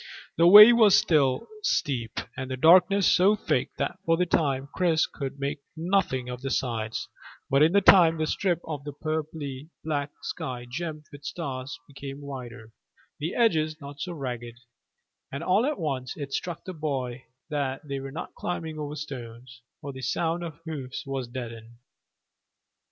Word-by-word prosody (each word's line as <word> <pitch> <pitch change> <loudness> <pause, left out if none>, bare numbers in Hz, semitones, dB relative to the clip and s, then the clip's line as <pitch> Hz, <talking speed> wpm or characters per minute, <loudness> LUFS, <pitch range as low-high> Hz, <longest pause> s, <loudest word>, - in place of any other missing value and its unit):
The 170 +1 +5
way 210 +5 +11
was 220 -4 +6
still 140 -6 +2 0.2
steep, 135 - -1 0.2
and 130 0 -5
the 130 - -3
darkness 180 +6 +6
so 195 +4 +5
thick 210 - -1
that - - -2
for 165 0 +2
a 180 - +3
time 140 -5 0
Chris 170 -3 +2
could 140 0 -6
make 140 +1 -2
out - - -47
nothing 165 -7 0
of 125 0 -6
the 135 - -3
sides; 115 -4 -2 0.4
but 140 +1 +4
in 160 +3 +5
time 185 -4 +6
the 155 - 0
strip 175 +2 0
of 150 -3 -5 0.2
purply 155 -2 -4
black 145 -2 -2
sky 130 -7 -5
gemmed 155 +3 -5
with 145 0 -12
stars 135 -5 -5
became 140 0 -8
wider, 125 -5 -8 0.5
the 155 +4 -3
edges 155 -9 +2
not 140 -1 -10
so 180 - -4
ragged, 120 -6 -5 0.8
and 140 - -5
all 200 +8 +3
at 300 -2 -1
once 135 -6 -3
it 140 -2 -6
struck 175 -3 -4
the 185 - -6
boy 135 -6 -3 0.3
that 140 0 -2
they 140 -1 -3
were 135 0 -6
not 155 - -7
climbing 160 -3 -4
over 150 0 -4
stones, 125 -4 -8 0.2
for 140 0 -6
the 130 - -8
sound 165 +6 -1
of 160 -3 -7
the 160 - -5
hoofs 135 -4 -6
was 135 -2 -3
deadened. 115 -2 -8
145 Hz, 170 wpm, -27 LUFS, 130-165 Hz, 0.8 s, way